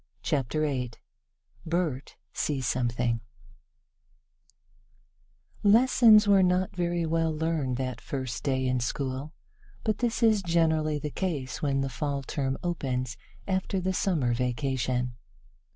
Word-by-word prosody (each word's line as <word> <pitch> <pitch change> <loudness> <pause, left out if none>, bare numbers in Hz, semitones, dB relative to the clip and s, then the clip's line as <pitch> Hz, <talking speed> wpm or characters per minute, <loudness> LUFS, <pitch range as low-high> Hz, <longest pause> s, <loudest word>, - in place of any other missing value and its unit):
CHAPTER 145 +1 0
VIII 130 -5 -1 0.7
BERT 160 -5 -2 0.2
SEES 135 -4 -1
SOMETHING 120 -1 0 2.4
LESSONS 220 0 +6
were 200 -1 +6
not 185 +1 +1
very 175 -1 0
well 165 0 +1
learned 155 -5 -1
that 130 -1 -3
first 130 -4 -4
day 130 -2 0
in 130 0 +1
school, 130 +3 -3 0.5
but 215 -2 0
this 235 -1 0
is 220 -3 +5
generally 160 -3 +2
the 150 0 -4
case 145 -9 -3
when 140 -2 +1
the 135 - -1
Fall 140 +2 -3
term 135 -1 -2
opens 130 -8 -2 0.3
after 190 0 0
the 185 +1 -1
Summer 160 -11 +1
vacation. 125 0 -1
150 Hz, 120 wpm, -28 LUFS, 130-175 Hz, 2.4 s, LESSONS